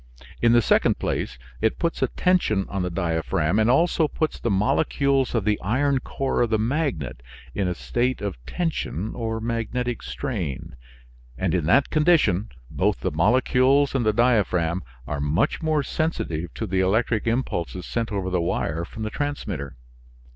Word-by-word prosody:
In 120 Hz, 0 st, +5 dB
the 120 Hz, -1 st, +5 dB
second -, -, +3 dB
place, 60 Hz, -, -2 dB, 0.2 s
it 110 Hz, 0 st, +1 dB
puts 170 Hz, -1 st, -1 dB
a -, -, +3 dB
tension 175 Hz, -, +1 dB
on 100 Hz, -, -2 dB
the 90 Hz, -, -1 dB
diaphragm 85 Hz, 0 st, 0 dB
and 110 Hz, +1 st, +3 dB
also 160 Hz, +4 st, +3 dB
puts 155 Hz, +1 st, -2 dB
the -, -, -1 dB
molecules 135 Hz, +5 st, +1 dB
of 110 Hz, -4 st, 0 dB
the 105 Hz, -1 st, +1 dB
iron 135 Hz, +7 st, +1 dB
core 135 Hz, 0 st, -2 dB
of 120 Hz, -, +2 dB
the 110 Hz, -, +2 dB
magnet 115 Hz, -, -1 dB, 0.3 s
in 100 Hz, -2 st, -1 dB
a 90 Hz, -, -1 dB
state 125 Hz, +7 st, -1 dB
of 95 Hz, -12 st, -5 dB
tension 115 Hz, -, -2 dB
or 115 Hz, -1 st, -3 dB
magnetic 115 Hz, +1 st, -2 dB
strain, 95 Hz, -, -4 dB, 0.6 s
and -, -, 0 dB
in 85 Hz, -5 st, 0 dB
that 135 Hz, +10 st, +4 dB
condition 150 Hz, -, +3 dB, 0.2 s
both -, -, 0 dB
the -, -, -1 dB
molecules 130 Hz, -, +3 dB
and 135 Hz, -3 st, +1 dB
the 110 Hz, -, +3 dB
diaphragm 100 Hz, -7 st, +2 dB, 0.2 s
are 75 Hz, +1 st, -3 dB
much 75 Hz, +8 st, +1 dB
more 155 Hz, -2 st, +1 dB
sensitive 85 Hz, -, -2 dB
to 110 Hz, -, -3 dB
the 95 Hz, -2 st, -1 dB
electric 110 Hz, +4 st, +1 dB
impulses 95 Hz, -7 st, -2 dB
sent 115 Hz, -1 st, -2 dB
over 95 Hz, -2 st, -2 dB
the 90 Hz, -1 st, +1 dB
wire 85 Hz, -1 st, -1 dB
from 110 Hz, +6 st, -7 dB
the 110 Hz, -, -3 dB
transmitter. 100 Hz, -, -4 dB
110 Hz, 165 wpm, -24 LUFS, 90-130 Hz, 0.6 s, In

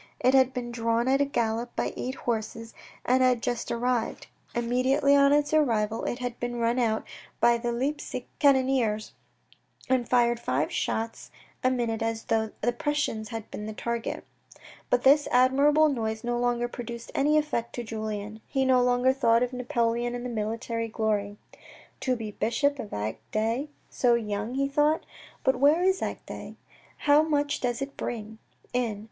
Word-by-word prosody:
It 255 Hz, -, +3 dB
had 265 Hz, -1 st, +5 dB
been 245 Hz, -2 st, -5 dB
drawn 230 Hz, 0 st, 0 dB
at 270 Hz, +1 st, +3 dB
a -, -, +4 dB
gallop 235 Hz, -3 st, -2 dB
by -, -, -1 dB
eight 255 Hz, +2 st, -4 dB
horses 225 Hz, -1 st, -4 dB, 0.3 s
and 255 Hz, +1 st, +3 dB
had 250 Hz, -2 st, +3 dB
just 240 Hz, -1 st, -2 dB
arrived. 240 Hz, 0 st, -1 dB, 0.3 s
Immediately 255 Hz, +4 st, +2 dB
on 280 Hz, 0 st, +5 dB
its 290 Hz, +1 st, +2 dB
arrival 225 Hz, -7 st, +1 dB
it -, -, -2 dB
had 245 Hz, -1 st, -5 dB
been 245 Hz, 0 st, -3 dB
run 235 Hz, +1 st, +1 dB
out 220 Hz, -2 st, 0 dB, 0.3 s
by 235 Hz, 0 st, +4 dB
the 240 Hz, 0 st, -2 dB
Leipsic 260 Hz, +1 st, -3 dB
cannoneers 260 Hz, -6 st, +2 dB, 0.8 s
and 255 Hz, -2 st, +1 dB
fired 240 Hz, -1 st, +3 dB
five 140 Hz, -, -1 dB
shots 225 Hz, 0 st, -3 dB, 0.3 s
a 255 Hz, -, +4 dB
minute 235 Hz, -3 st, -1 dB
as 225 Hz, 0 st, -2 dB
though 220 Hz, -1 st, 0 dB
the 240 Hz, -, +2 dB
Prussians 240 Hz, -4 st, -2 dB
had 225 Hz, -2 st, -7 dB
been 210 Hz, -, -6 dB
the 215 Hz, -, -5 dB
target. 235 Hz, 0 st, -3 dB, 0.6 s
But 245 Hz, -, +2 dB
this 290 Hz, +2 st, +5 dB
admirable 280 Hz, +5 st, +4 dB
noise 220 Hz, -5 st, -2 dB
no 240 Hz, 0 st, -1 dB
longer 240 Hz, 0 st, +1 dB
produced 235 Hz, -1 st, -7 dB
any 300 Hz, +2 st, +3 dB
effect 295 Hz, -7 st, -1 dB
on 240 Hz, -, -4 dB
Julien. 215 Hz, -1 st, -5 dB
He 270 Hz, -1 st, 0 dB
no 255 Hz, -1 st, +4 dB
longer 245 Hz, +1 st, +3 dB
thought 235 Hz, -3 st, +3 dB
of 250 Hz, +1 st, -3 dB
Napoleon 240 Hz, -2 st, 0 dB
and 245 Hz, 0 st, -5 dB
military 230 Hz, +1 st, -2 dB
glory. 210 Hz, -2 st, -1 dB, 0.3 s
" -, -, -21 dB
To 255 Hz, -1 st, 0 dB
be 220 Hz, -3 st, -5 dB
bishop 275 Hz, +7 st, 0 dB
of 210 Hz, -, -5 dB
Agde 220 Hz, -, -2 dB, 0.2 s
so 240 Hz, -2 st, +3 dB
young," 215 Hz, +1 st, -3 dB
he 275 Hz, +1 st, +1 dB
thought. 295 Hz, +3 st, +2 dB, 0.2 s
" -, -, -24 dB
But 265 Hz, -, +2 dB
where 295 Hz, +6 st, +4 dB
is 380 Hz, 0 st, +2 dB
Agde? -, -, -6 dB, 0.5 s
How 290 Hz, +1 st, +6 dB
much 290 Hz, -2 st, 0 dB
does 245 Hz, +1 st, -1 dB
it 275 Hz, 0 st, -8 dB
bring 220 Hz, -1 st, -5 dB, 0.3 s
in? 235 Hz, -4 st, -1 dB
240 Hz, 170 wpm, -27 LUFS, 225-265 Hz, 0.8 s, How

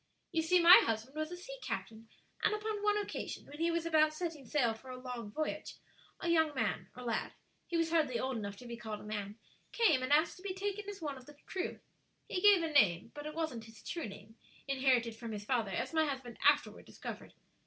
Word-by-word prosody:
"You 330 Hz, -2 st, +2 dB
see, 355 Hz, +3 st, +4 dB
my 345 Hz, +2 st, +10 dB
husband 225 Hz, +5 st, -2 dB
was 310 Hz, 0 st, -2 dB
a 355 Hz, -, -5 dB
sea -, -, -9 dB
captain, 225 Hz, 0 st, -5 dB, 0.3 s
and 425 Hz, -, +3 dB
upon 425 Hz, -1 st, -3 dB
one 415 Hz, 0 st, +3 dB
occasion, 415 Hz, -, -4 dB
when 290 Hz, +2 st, -11 dB
he 335 Hz, +1 st, +2 dB
was 335 Hz, 0 st, 0 dB
about 310 Hz, -2 st, +4 dB
setting 315 Hz, -6 st, -4 dB
sail 240 Hz, -4 st, +2 dB
for 240 Hz, +4 st, -13 dB
a 255 Hz, -, -6 dB
long 250 Hz, -4 st, -6 dB
voyage, 310 Hz, +8 st, -3 dB, 0.4 s
a -, -, -3 dB
young 320 Hz, -3 st, +3 dB
man, -, -, -1 dB
or 250 Hz, -, -7 dB
lad 230 Hz, -2 st, -2 dB, 0.3 s
he 340 Hz, -, -1 dB
was 330 Hz, -1 st, +1 dB
hardly 300 Hz, -7 st, +2 dB
old 260 Hz, +1 st, -1 dB
enough 200 Hz, -2 st, -4 dB
to 250 Hz, -, -11 dB
be 235 Hz, -1 st, -6 dB
called 220 Hz, -3 st, -6 dB
a -, -, -11 dB
man 210 Hz, 0 st, -5 dB, 0.3 s
came 330 Hz, -, +4 dB
and 255 Hz, +2 st, -2 dB
asked 310 Hz, +3 st, +4 dB
to -, -, -14 dB
be 380 Hz, -1 st, -4 dB
taken 405 Hz, +1 st, -3 dB
as 400 Hz, -4 st, -8 dB
one 285 Hz, -3 st, -3 dB
of 255 Hz, -, -14 dB
the 295 Hz, -1 st, -13 dB
crew. 380 Hz, +1 st, -3 dB, 0.5 s
He 365 Hz, -, -2 dB
gave 405 Hz, -4 st, +7 dB
a 325 Hz, -, -1 dB
name, 205 Hz, -, +4 dB
but 295 Hz, 0 st, -6 dB
it 305 Hz, -, -6 dB
wasn't 315 Hz, -9 st, -3 dB
his 225 Hz, -1 st, -15 dB
true 335 Hz, -7 st, -3 dB
name, 210 Hz, +3 st, -12 dB, 0.3 s
inherited 260 Hz, -4 st, +2 dB
from 230 Hz, -1 st, -6 dB
his 205 Hz, -1 st, -6 dB
father, 230 Hz, -4 st, +1 dB
as 190 Hz, -, -2 dB
my 315 Hz, -1 st, +3 dB
husband 260 Hz, -4 st, -5 dB
afterward -, -, +3 dB
discovered. -, -, -8 dB
290 Hz, 230 wpm, -34 LUFS, 230-335 Hz, 0.5 s, my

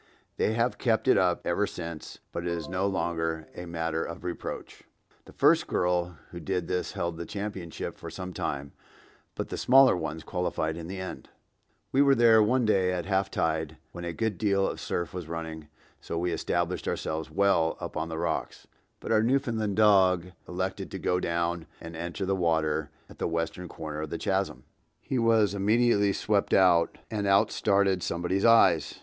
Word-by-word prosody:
They 110 Hz, -, +1 dB
have 115 Hz, +2 st, 0 dB
kept 115 Hz, 0 st, +1 dB
it -, -, +6 dB
up 90 Hz, -1 st, +2 dB
ever 100 Hz, +4 st, +1 dB
since, 85 Hz, -2 st, -7 dB
but -, -, -4 dB
it 85 Hz, -, -3 dB
is 85 Hz, -3 st, -3 dB
no 90 Hz, +2 st, 0 dB
longer 80 Hz, -3 st, -2 dB
a 90 Hz, -, -8 dB
matter 80 Hz, -1 st, -2 dB
of 85 Hz, -, -7 dB
reproach.) 90 Hz, -1 st, -6 dB, 0.4 s
The -, -, -14 dB
first -, -, +3 dB
girl 90 Hz, -1 st, 0 dB
who 85 Hz, -, -7 dB
did 90 Hz, 0 st, -2 dB
this 90 Hz, -, -2 dB
held 85 Hz, -1 st, -3 dB
the 85 Hz, -, -5 dB
championship 100 Hz, -5 st, -5 dB
for -, -, -7 dB
some 90 Hz, -1 st, -7 dB
time, 70 Hz, -3 st, -3 dB, 0.6 s
but -, -, -4 dB
the -, -, -4 dB
smaller 130 Hz, -1 st, +6 dB
ones 80 Hz, -2 st, -4 dB
qualified 80 Hz, -3 st, -2 dB
in 85 Hz, -1 st, -7 dB
the 95 Hz, +2 st, -6 dB
end. 95 Hz, -, -7 dB, 0.6 s
We 135 Hz, -, +4 dB
were 140 Hz, -1 st, +5 dB
there 115 Hz, -2 st, +6 dB
one 120 Hz, +3 st, +2 dB
day 95 Hz, -4 st, +3 dB
at 90 Hz, -2 st, -2 dB
half 95 Hz, 0 st, +1 dB
tide 80 Hz, -2 st, -1 dB
when 85 Hz, -, -8 dB
a 85 Hz, -, -3 dB
good 105 Hz, +1 st, -2 dB
deal 100 Hz, -2 st, +2 dB
of -, -, -4 dB
surf 85 Hz, -4 st, -3 dB
was 90 Hz, -3 st, -6 dB
running, 80 Hz, -2 st, -6 dB, 0.3 s
so 85 Hz, -, -5 dB
we 90 Hz, +1 st, 0 dB
established -, -, -1 dB
ourselves 80 Hz, +1 st, -2 dB
well 95 Hz, -5 st, +2 dB
up -, -, -6 dB
on 85 Hz, -, -2 dB
the 80 Hz, -, -4 dB
rocks, 85 Hz, -1 st, -3 dB, 0.3 s
but -, -, -5 dB
our 110 Hz, -1 st, +4 dB
Newfoundland 115 Hz, -4 st, 0 dB
dog 95 Hz, -4 st, +4 dB, 0.2 s
elected 95 Hz, +1 st, -3 dB
to -, -, -5 dB
go 90 Hz, -, 0 dB
down 85 Hz, -1 st, -1 dB
and 80 Hz, 0 st, -9 dB
enter 85 Hz, +4 st, -4 dB
the 95 Hz, +1 st, +1 dB
water 80 Hz, -4 st, 0 dB, 0.2 s
at -, -, -16 dB
the -, -, 0 dB
western 85 Hz, +2 st, -3 dB
corner 75 Hz, -2 st, -6 dB
of 80 Hz, -, -4 dB
the -, -, -3 dB
chasm. 65 Hz, -, -1 dB, 0.4 s
He 130 Hz, -, -2 dB
was 110 Hz, -4 st, +3 dB
immediately 105 Hz, 0 st, +3 dB
swept 105 Hz, 0 st, +1 dB
out, 90 Hz, -3 st, +4 dB
and 105 Hz, -2 st, -1 dB
out 100 Hz, +2 st, +4 dB
started 100 Hz, -2 st, +2 dB
somebody's 90 Hz, +4 st, -1 dB
eyes! 115 Hz, -9 st, +5 dB
90 Hz, 185 wpm, -28 LUFS, 85-100 Hz, 0.6 s, it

